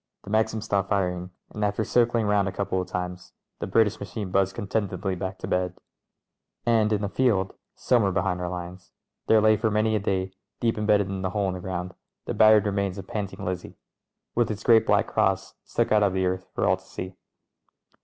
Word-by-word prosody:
The 100 - -9
Maxim 110 0 +1
stopped 100 -3 -1
firing, 90 -3 0 0.2
and 105 - -4
after 105 +1 +1
circling 120 0 +2
round 105 -1 +2
a - - -1
couple 95 -1 -1
of 90 - -6
times 90 0 -5 0.3
the - - -3
British 105 +2 +2
machine 100 0 -5
buzzed 95 0 +2
contentedly 95 -2 -2
back 95 +1 -4
to - - -6
bed. 90 0 0 0.9
And 110 -2 +3
in 105 -1 +1
a - - 0
field 100 -3 +1
— - - -57
somewhere 115 -6 +4
behind 95 -1 0
our 90 - -2
lines 90 0 -7 0.2
— - - -55
there 110 - +6
lay 110 0 +5
for 110 +1 +1
many 110 +1 +2
a - - +2
day, 95 -1 -1 0.3
deep 115 -1 +1
embedded 105 -2 +2
in 95 -1 -4
a 95 - 0
hole 100 +1 0
in - - -2
the 90 - -5
ground, 90 0 -4 0.3
the - - -3
battered 110 -1 +6
remnants 100 -2 -1
of 95 - -7
Panting 100 0 -5
Lizzie, 90 -1 -5 0.6
with 120 -2 +1
its 105 -2 -4
great 115 -1 +5
black - - +4
cross - - 0
stuck - - 0
out 105 - +5
of 100 -2 +3
the 95 0 +1
earth 90 0 -2
for - - +1
all - - +3
to - - -20
see. 95 0 -7
100 Hz, 215 wpm, -26 LUFS, 95-110 Hz, 0.9 s, there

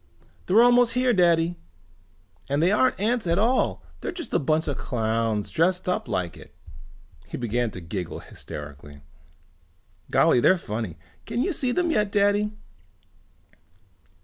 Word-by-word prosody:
"They're 215 +6 +6
almost 245 -1 +5
here, 250 0 +2
Daddy! 170 -2 +3 0.9
And 140 +1 +1
they 170 +4 +3
aren't 255 +2 +2
ants 225 0 0
at 170 +1 +2
all. 235 +5 +1 0.2
They're - - -4
just 350 -2 -8
a - - +3
bunch 155 +3 0
of 145 - -1
clowns 110 -3 -1
dressed 180 +3 +1
up 180 - -1
like 90 -1 -2
it." - - -15 0.7
He - - -6
began 120 0 -1
to 90 - -9
giggle 85 +1 -5
hysterically. 75 0 -10 1.1
"Golly, - - +4
they're 185 +9 +4
funny. 105 - -5 0.3
Can 235 +3 -1
you 385 - -1
see 255 -4 -1
them 345 +5 +1
yet, 210 -8 +1
Daddy?" 205 +1 +2
175 Hz, 145 wpm, -25 LUFS, -, 1.1 s, They're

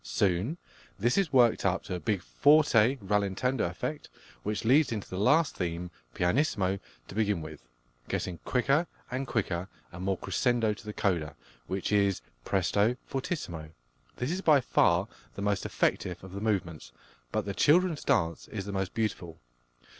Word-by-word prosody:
Soon 90 - 0 0.4
this 120 +5 +1
is 190 -7 +1
worked 120 -4 +4
up 95 0 +1
to 95 - -5
a 90 - -2
big 100 -2 -1
forte 140 -4 +4
rallentando 105 +5 0
effect, - - -5 0.3
which 105 +2 -3
leads 135 +4 +4
into 105 -3 -3
the 95 - -5
last 145 +7 +3
theme, 85 0 -3 0.2
pianissimo 95 - +1 0.3
to - - -10
begin 105 -3 +1
with, 80 -3 -9 0.5
getting 90 -3 -3
quicker 140 +6 +1 0.2
and 130 +2 -2
quicker 95 -6 -1 0.2
and 90 +1 -7
more 95 -1 0
crescendo 120 -1 +1
to 105 - -13
the 105 - -4
coda, 85 -8 -1 0.3
which 95 +2 -2
is 100 -8 +2 0.2
presto 100 - +1
fortissimo. 90 - -4 0.5
This 125 +5 -2
is 185 +2 -2
by 155 -6 +5
far 90 -6 +3 0.3
the 100 - -4
most 100 -1 0
effective 90 -1 -1
of 95 - -10
the 100 - -5
movements, 85 - -2 0.4
but - - -1
the - - -3
"Children's 170 0 +3
Dance" 90 -12 +1
is 100 -3 -5
the 100 - -5
most 95 -1 -2
beautiful. 90 -7 -3
100 Hz, 160 wpm, -29 LUFS, 90-125 Hz, 0.5 s, by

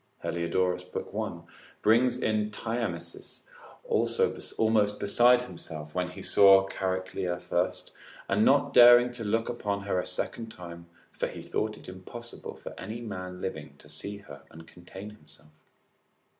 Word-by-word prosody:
4865]Heliodorus, 90 +1 -1
lib. - - -4
1. - - -4 0.4
brings 120 +4 +4
in 105 -1 0
Thyamis 115 +2 -5 0.4
almost 110 - +1
besides 120 +4 +4
himself, 80 -7 -8
when 90 0 -1
he 90 - -9
saw 95 -1 +6
Chariclia 95 -2 -2
first, 90 0 -2 0.4
and 105 +2 +2
not 140 +2 +4
daring 120 0 +8
to 120 -1 -6
look 115 +2 0
upon 100 -4 -2
her 100 -2 0
a - - -3
second 115 -1 -4
time, 85 -3 -10 0.2
for - - -2
he - - -8
thought 110 0 -2
it - - -14
impossible 105 +6 -9
for - - -9
any 110 +5 -6
man 90 -5 -6
living 80 -6 -6
to - - -16
see 90 +7 -6
her 70 -9 -12
and 80 +1 -13
contain 95 +5 -11
himself. 105 -7 -19
100 Hz, 145 wpm, -28 LUFS, 90-115 Hz, 0.4 s, daring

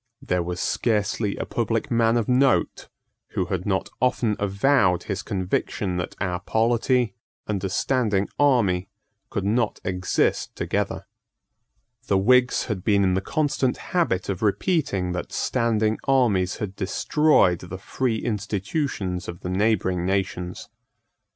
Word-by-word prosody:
There 90 -1 -1
was 90 +1 -4
scarcely 105 -2 0
a - - -3
public 115 0 -2
man 115 0 +3
of 115 - 0
note 130 +2 +2 0.4
who 95 - 0
had 90 0 -3
not 95 -2 0
often 120 -4 +2
avowed 100 -2 +2
his 100 -1 -3
conviction 95 -1 -2
that 90 - -4
our 90 -3 -1
polity 115 +3 +1 0.3
and 100 -3 -3
a 95 - -1
standing 105 -2 +1
army 100 -10 +3 0.4
could 100 - -3
not 110 +2 0
exist 90 -1 0
together. 100 -1 -2 1.0
The 100 - +3
Whigs 125 +6 +4
had 100 -6 -4
been 100 -2 +3
in 95 -1 +2
the 95 - +1
constant 140 0 0 0.2
habit 165 - +1
of 95 -3 -3
repeating 105 - 0
that 90 - -4
standing 110 -3 0
armies 110 -9 +2
had 105 -4 -5
destroyed 100 - +2
the 90 +1 -7
free 115 +4 -1
institutions 105 - -2
of 85 - -7
the 90 - -4
neighbouring 95 -3 +1
nations. 90 -2 -2
100 Hz, 135 wpm, -24 LUFS, 95-120 Hz, 1.0 s, Whigs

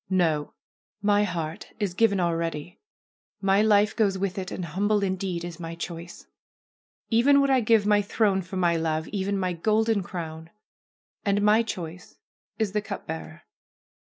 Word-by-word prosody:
No! 165 -6 +1 0.5
My 205 0 +4
heart 165 -4 -5
is 200 -4 -1
given 200 -1 +3
already. 165 -2 -2 0.6
My 195 +1 +3
life 210 -1 +4
goes 200 -4 +2
with 195 0 -2
it, 185 -1 -5
and 180 - -4
humble 200 +5 +1
indeed 185 -2 -2
is 175 -1 -7
my 165 -1 -6
choice! 170 0 -7 0.9
Even 270 +5 +5
would 275 0 +3
I 265 - +5
give 225 -2 +3
my 210 0 +4
throne 200 -1 +1
for 185 +1 -7
my 175 -2 +2
love, 160 -1 -1
even 200 0 -1
my 185 -2 -1
golden 215 +4 +1
crown! 165 -3 -7 0.7
And 205 0 +1
my 210 +2 +5
choice 180 -6 -7 0.4
is 220 -3 0
the 210 +1 0
cup 200 -1 -6
bearer." 160 +1 -7
190 Hz, 160 wpm, -26 LUFS, 170-210 Hz, 0.9 s, Even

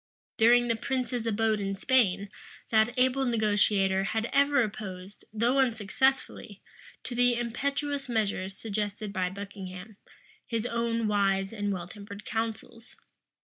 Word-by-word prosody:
During 240 +2 +5
the 230 - +1
prince's 250 -1 -2
abode 220 0 +1
in 195 -1 -2
Spain, 200 -4 +2 0.4
that 220 +1 +4
able 260 +1 +3
negotiator 205 -5 +2
had 220 +2 -1
ever 280 -1 +4
opposed, 200 -2 -7
though 235 +5 +2
unsuccessfully, 260 +2 0 0.4
to - - -5
the 245 0 +3
impetuous 275 +4 -2
measures 200 -4 -1
suggested 210 -1 -3
by 185 -2 0
Buckingham, 195 0 -8 0.5
his 230 -1 -2
own 230 -1 0
wise 195 -1 +1
and 205 -2 -2
well 175 -3 -4
tempered 200 +2 -10
counsels. 225 +1 -4
220 Hz, 125 wpm, -28 LUFS, 200-240 Hz, 0.5 s, During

